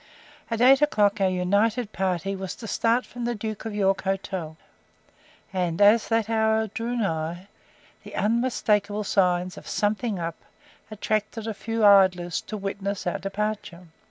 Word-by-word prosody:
At 230 0 -2
eight 270 +3 +6
o'clock 205 -8 +2
our 190 - +4
united 205 +5 +1
party 190 +1 -1
was 190 -1 -5
to 225 - -9
start 230 +3 +1
from 240 0 -6
the 240 0 -1
"Duke 215 0 -5
of 220 -2 -4
York" 195 -1 +1
hotel, 190 -4 -3 1.0
and 180 -2 -1
as 210 +2 +5
that 225 -2 +1
hour 220 0 +2
drew 230 +3 -4
nigh, 175 -3 -2 0.5
the - - -11
unmistakeable 210 -3 +1
signs 180 -2 +1
of - - -16
"something 210 +1 -1
up," 165 -1 -4 0.5
attracted 215 +1 -2
a 225 - -3
few 225 +1 -1
idlers 185 -4 +4
to 215 - -4
witness 200 0 -4
our 175 - -1
departure. 195 -3 -4
205 Hz, 150 wpm, -25 LUFS, 190-225 Hz, 1.0 s, eight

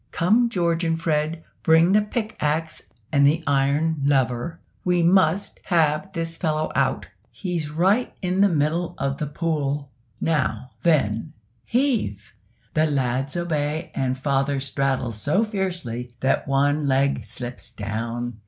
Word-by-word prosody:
"Come, 225 +8 +3
George 170 -5 0
and 165 -1 0
Fred, 160 0 -1 0.2
bring 160 +2 +5
the 210 +2 +5
pick 215 +1 -3
axe 155 +2 -1 0.3
and 140 -2 +5
the 160 +3 +2
iron 145 +3 +1
lever, 135 +3 +1 0.2
we 180 -1 +2
must 185 +1 +3
have 165 0 +1
this 165 0 -2
fellow 155 -3 -1
out, - - 0 0.2
he's 175 -5 -3
right 190 +10 +2
in 185 0 0
the 200 - +6
middle 165 +2 0
of 140 0 -2
the 150 - -2
pool. 145 -2 -2 0.3
Now, 145 -5 -1
then, 145 -3 +1 0.3
heave!" 230 - 0 0.4
The 155 +1 +3
lads 135 +2 -1
obey, 155 -3 -2
and 130 -1 -1
father 140 0 0
straddles 135 -5 -1
so 175 +10 +2
fiercely 175 - -3
that 135 - +1
one 145 +2 +2
leg 135 -2 +2
slips 120 +3 -6
down. 115 +2 -4
150 Hz, 135 wpm, -23 LUFS, 135-170 Hz, 0.4 s, the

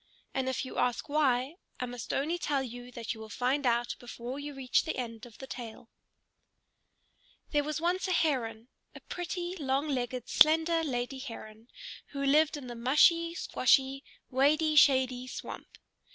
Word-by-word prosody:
And 260 -1 0
if 260 - -2
you 255 - -5
ask 250 +3 0
why, 280 0 +1 0.2
I 250 - -1
must 245 -1 -6
only 320 +6 0
tell 280 -5 0
you 245 0 -8
that 235 -2 -4
you 225 - -12
will 220 0 -9
find 255 +5 0
out 240 0 +1
before 245 +2 -7
you 290 0 -6
reach 260 -2 +2
the 320 - -3
end 230 -2 -5
of 230 - -16
the 265 - -8
tale. 235 -3 -9 1.6
There 295 -1 +2
was 305 +1 -3
once 355 +3 0
a - - -1
Heron, 245 -9 0 0.3
a - - -8
pretty, 355 0 -4
long 275 -1 0
legged, 250 -2 -2
slender 325 +1 +4
lady 260 -2 -2
Heron, 225 -3 -9 0.5
who 280 0 -3
lived 300 +2 +4
in 280 - -8
the 245 - -6
mushy 320 +8 +4
squshy, 270 -3 +2 0.3
wady 305 +4 +3
shady 260 -3 +4
swamp. - - -8
265 Hz, 165 wpm, -30 LUFS, 245-300 Hz, 1.6 s, slender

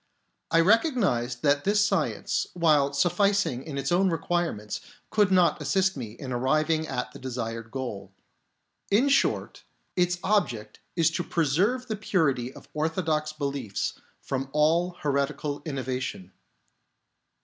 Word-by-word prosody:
I 165 - +4
recognised 185 - +2
that 145 -1 +3
this 205 +1 +3
science, 195 -7 0
while 150 -5 +3
sufficing 180 - +2 0.2
its 135 +2 -2
own 185 +2 +3
require 175 +1 0
ments, 105 0 -6 0.3
could 210 -2 +3
not 180 -3 +4
assist 190 +6 +1
me 115 -6 -6
in 130 +2 -7
arriving 155 +5 +1
at 125 - -3
the - - -11
desired 115 -3 -5
goal. 125 -5 -5 0.8
In 235 +8 +4
short, 275 - +1 0.3
its 180 -1 +2
object 175 - 0 0.2
is 165 -2 +3
to 175 - -2
preserve 180 - +1
the 220 - -2
purity 150 - 0
of - - -14
orthodox 155 -1 0
beliefs 140 -8 -3 0.3
from 135 0 -3
all 165 +4 +3
heretical 145 0 -1
innovation. 130 - -4
155 Hz, 125 wpm, -27 LUFS, 130-180 Hz, 0.8 s, I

